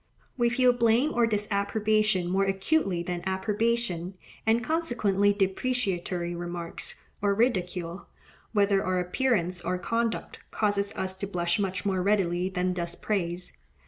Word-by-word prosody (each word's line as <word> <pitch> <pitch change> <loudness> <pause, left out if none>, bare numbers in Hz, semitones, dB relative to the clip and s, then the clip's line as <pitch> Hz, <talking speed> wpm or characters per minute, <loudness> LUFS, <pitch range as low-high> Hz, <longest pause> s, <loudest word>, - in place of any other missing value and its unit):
We 240 -2 +2
feel 250 0 +4
blame 240 +5 +3
or 235 -1 +3
disapprobation 210 -2 +1
more 190 +2 +2
acutely 195 - +1
than 175 0 -3
approbation; 195 -2 0 0.3
and 230 +2 +3
consequently 230 - +2
depreciatory 190 -4 -1
remarks 175 -1 -5 0.2
or 200 -1 +2
ridicule, 180 -6 -1 0.4
whether 200 -2 +3
of - - -3
our 185 0 +1
appearance 180 -2 0
or 180 +2 -1
conduct, 230 +5 -2
causes 205 -1 0
us 190 0 -2
to 200 - -3
blush 175 -1 0
much 190 -1 -2
more 190 -2 +1
readily 185 -2 +1
than 180 -1 0
does 170 -1 -3
praise. 180 -4 -2
195 Hz, 135 wpm, -28 LUFS, 180-220 Hz, 0.4 s, feel